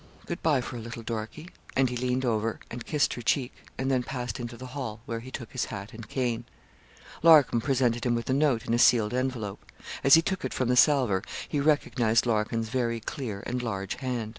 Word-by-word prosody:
Good 170 - -5
bye 150 -5 +3
for 125 0 -6
a - - -5
little, 115 0 -7
Dorkie,' 115 +10 -5 0.2
and 135 0 +4
he 125 - -4
leaned 125 +1 0
over 115 -1 +1
her - - -18
and 120 0 -6
kissed 150 -2 +1
her 120 - -6
cheek, 125 +2 0 0.2
and 135 +1 -1
then 130 -1 +2
passed 125 +1 -4
into 120 0 -6
the 130 - -8
hall, 115 -6 -5
where 115 -2 -3
he 125 +3 -10
took 125 -1 -7
his 130 -3 -1
hat 100 +1 -7
and 110 -1 -10
cane. 120 -3 -1 0.8
Larcom 155 -7 +6
presented 125 -2 +1
him 120 - +2
with 115 - -3
a 130 - +1
note, 135 -5 +2
in - - -1
a 120 - +2
sealed 115 -3 +5
envelope. 125 -6 -2 0.4
As 135 - +8
he 165 - +5
took 190 +2 -2
it - - -3
from 130 -2 0
the 125 - +3
salver 125 -7 +4 0.3
he 145 - -1
recognised 125 -6 +2
Larkin's 115 0 0
very 120 -2 -1
clear 110 -4 -5
and 125 +1 -2
large 100 -5 -3
hand. 125 -4 -3
120 Hz, 220 wpm, -28 LUFS, 115-130 Hz, 0.8 s, As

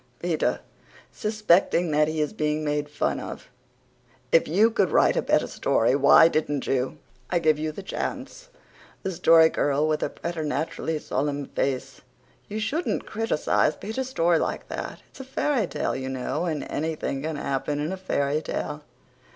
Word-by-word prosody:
PETER, - - -1 0.5
SUSPECTING 200 -6 +2
THAT 150 0 +3
HE 155 0 -1
IS 150 - -1
BEING 155 -5 -1
MADE 150 0 -1
FUN 145 - -1
OF: - - -8 0.8
"If 165 - +4
you 210 +8 +4
could 200 -5 +2
write - - +4
a - - +2
better - - +2
story, 115 +4 +1
why 140 +3 +7
didn't 150 -3 -1
you? 130 -1 -1 0.3
I 180 - +1
give 155 -3 +2
you 155 0 -2
the 195 +6 -8
chance." - - -5 0.5
THE 190 - -2
STORY 165 -2 +6
GIRL, 145 0 +1
WITH 155 -1 0
A - - 0
PRETERNATURALLY 160 -1 -3
SOLEMN 145 -1 -2
FACE: 135 0 -2 0.5
"You 210 +1 -4
shouldn't 280 +11 -1
criticize 215 -8 +1
Peter's 250 +5 -4
story 170 -8 +2
like - - -3
that. - - -6
It's - - -16
a - - -5
fairy 260 -4 0
tale, - - -2
you 130 0 -4
know, 130 +6 -2
and 155 -4 -2
anything 155 -3 -3
can 160 +1 -3
happen 145 +1 -2
in 155 +5 -2
a - - -4
fairy 150 -5 -1
tale." 150 -1 -4
155 Hz, 165 wpm, -25 LUFS, 145-190 Hz, 0.8 s, why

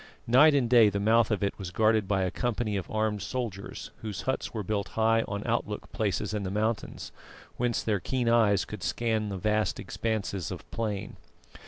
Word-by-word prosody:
Night 145 +6 +6
and 130 -4 +2
day 115 -3 +6
the 100 - -2
mouth 110 +2 +4
of 105 -3 0
it 100 - -1
was 95 -3 -5
guarded 110 +1 +2
by 95 -2 +1
a 90 - -1
company 120 -3 -1
of 95 - -3
armed 110 -1 0
soldiers, 105 -2 -5
whose 105 -3 -5
huts 130 - -2
were 110 -2 -4
built 100 +1 -1
high 115 0 +4
on 100 0 -4
outlook 115 -3 -2
places 105 -1 -1
in 105 - -1
the 95 - -3
mountains, 110 +3 -2 0.5
whence 120 -1 0
their 105 -3 +1
keen 125 +6 -1
eyes 110 -4 +4
could 105 -3 -8
scan 110 +1 -1
the 100 - -4
vast 105 +3 0
expanses 100 -6 -3
of - - -7
plain. 105 -4 -3
110 Hz, 190 wpm, -28 LUFS, 100-115 Hz, 0.5 s, Night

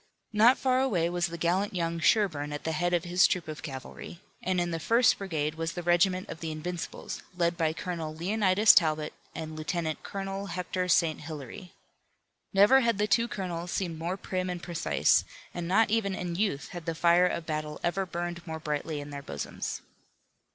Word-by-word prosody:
Not 230 +5 +6
far 255 -1 +2
away 175 -10 +1
was 175 0 0
the 170 0 -6
gallant 185 +4 0
young 170 -1 -1
Sherburne 160 -7 +2
at 145 - -5
the 160 - -1
head 175 +3 0
of 175 -1 +1
his 180 +1 +4
troop 180 -3 -2
of 155 0 -6
cavalry, 135 +4 -8 0.2
and 185 0 0
in 175 0 0
the 165 - -2
first 230 +8 +4
brigade 155 -6 -2
was 165 +1 -3
the 175 - -5
regiment 180 +2 +2
of 160 - -7
the 165 -1 -4
Invincibles 165 +2 -5 0.2
led 170 -1 +2
by 160 -2 +1
Colonel 165 -1 -4
Leonidas 200 +4 +4
Talbot 155 -2 +2 0.2
and 155 -1 -5
Lieutenant 155 0 -2
Colonel 195 0 -5
Hector 180 0 -2
St. 165 -2 +2
Hilaire. 150 +3 -8 0.8
Never 205 +7 +6
had 235 -5 +1
the 210 - +2
two 230 +2 +2
colonels 180 -5 -4
seemed 170 -3 -2
more 175 +3 -2
prim 185 -1 -3
and 175 -1 -5
precise, 170 -2 +2 0.3
and 175 -1 -4
not 210 +4 +3
even 205 -4 +1
in 175 -2 -4
youth 180 -6 -1
had 175 -1 -8
the 165 - -1
fire 175 +2 +5
of 170 -2 -3
battle 155 -1 -3
ever 190 +2 0
burned 175 0 -4
more 160 0 -4
brightly 150 0 -3
in 145 0 -9
their 140 0 -6
bosoms. 70 - -5
175 Hz, 190 wpm, -29 LUFS, 160-190 Hz, 0.8 s, Not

